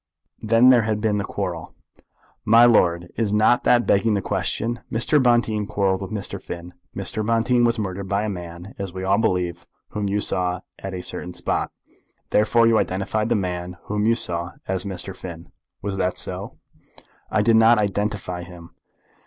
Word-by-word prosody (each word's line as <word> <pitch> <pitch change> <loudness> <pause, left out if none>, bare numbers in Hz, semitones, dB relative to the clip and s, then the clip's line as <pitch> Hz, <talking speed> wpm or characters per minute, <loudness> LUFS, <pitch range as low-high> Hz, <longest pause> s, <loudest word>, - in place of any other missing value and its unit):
"Then 115 +3 +5
there 125 -2 +6
had 110 -1 -1
been 105 -1 0
the - - -1
quarrel." 90 -6 -5 0.7
"My 115 +2 +6
lord, 85 -7 +3
is 110 -3 0
not 110 +3 +4
that 120 -1 +4
begging 105 +2 +3
the 100 - 0
question? 120 +6 -2
Mr. 125 +6 +2
Bonteen 120 -4 +2
quarrelled 95 -2 0
with 95 - -5
Mr. 100 -2 -5
Finn. 85 +1 -8 0.2
Mr. 110 - -3
Bonteen 115 +2 +2
was 115 0 +2
murdered 100 -2 -4
by 100 +2 +1
a - - -1
man, 90 +1 -7
as 100 -2 -4
we 95 0 -5
all 95 +2 +2
believe, 90 -6 -1 0.2
whom 105 -1 -3
you 100 +1 0
saw 90 -2 -1 0.2
at 95 -1 -6
a 90 - -6
certain 90 0 -6
spot. - - -2 0.6
Therefore 115 +2 +4
you 115 -1 +4
identified 105 +4 -1
the - - +2
man 90 -2 -3
whom 105 +1 -1
you 115 - +4
saw 85 -6 -2
as 95 0 -2
Mr. 95 0 -5
Finn. 85 -2 -9 0.3
Was 100 -1 -3
that 90 -1 -1
so?" - - -1 0.7
"I 105 - +1
didn't 115 0 +5
identify 105 -5 +1
him." 85 -1 -12
100 Hz, 175 wpm, -23 LUFS, 90-110 Hz, 0.7 s, there